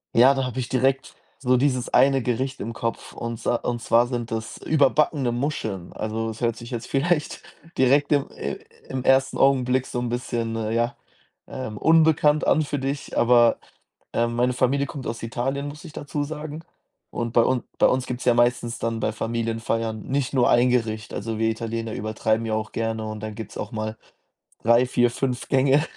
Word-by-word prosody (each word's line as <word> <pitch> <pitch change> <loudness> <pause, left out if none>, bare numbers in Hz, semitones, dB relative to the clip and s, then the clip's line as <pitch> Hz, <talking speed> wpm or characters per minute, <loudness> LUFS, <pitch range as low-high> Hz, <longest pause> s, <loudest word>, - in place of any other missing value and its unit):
Ja, 130 +4 +7
da 135 - 0
habe 125 0 -4
ich 120 - -3
direkt 130 +1 0 0.2
so 125 -2 +3
dieses 130 -2 +1
eine 135 0 +4
Gericht 130 +3 -2
im 115 +2 -4
Kopf 115 0 -4
und 115 -1 -5
sa 120 - 0
und 120 0 -2
zwar 115 +1 +4
sind 120 -2 -4
das 110 0 -4
überbackene 145 -3 +2
Muscheln. 120 - -3
Also, 110 +1 -3
das 110 -1 -6
hört 115 -2 0
sich 120 +1 -10
jetzt 120 -2 -4
vielleicht 150 +3 0 0.4
direkt 140 +3 +4
im 145 -2 +2
i - - -4 0.3
im 130 -1 -3
1. 135 0 +3
Augenblick 130 -1 +3
so 125 - -3
'n 120 -1 -2
bisschen, 120 -2 -2
äh, 110 -1 -2
ja, 120 +1 0 0.5
ähm, 130 -5 -6
unbekannt 160 -2 +4
an 155 - +4
für 145 -1 -2
dich, 135 +1 -4
aber, 120 -1 +5 0.6
ähm, 120 0 0
meine 125 +1 +2
Familie 130 +3 +1
kommt 135 -1 -7
aus 115 +1 -5
Italien, 135 +5 -2
muss 150 +1 -9
ich 155 - -10
dazu 145 0 -3
sagen. 155 +1 -6 0.5
Und 115 -1 -4
bei 115 - +5
un 130 -2 +1 0.2
bei - - +6
uns 130 0 +1
gibt's 125 -1 -5
ja 120 -2 +4
meistens 120 0 +1
dann 115 0 -2
bei 110 - 0
Familienfeiern 115 -1 -2
nicht 135 0 -1
nur 125 -2 +4
1 120 +1 +5
Gericht. 115 -3 -1
Also, 110 +1 -4
wir 110 0 +2
Italiener 115 0 -3
übertreiben 110 +1 -1
ja 110 - -2
auch 110 0 -2
gerne 115 -1 -2
und 110 0 -6
dann 110 0 -5
gibt's 110 +1 -8
auch - - -5
mal 110 -1 -4 0.7
3, 115 +2 +5
4, 120 -1 +2
5 125 -1 -3
Gänge. 135 +2 +4
120 Hz, 190 wpm, -24 LUFS, 115-135 Hz, 0.7 s, Ja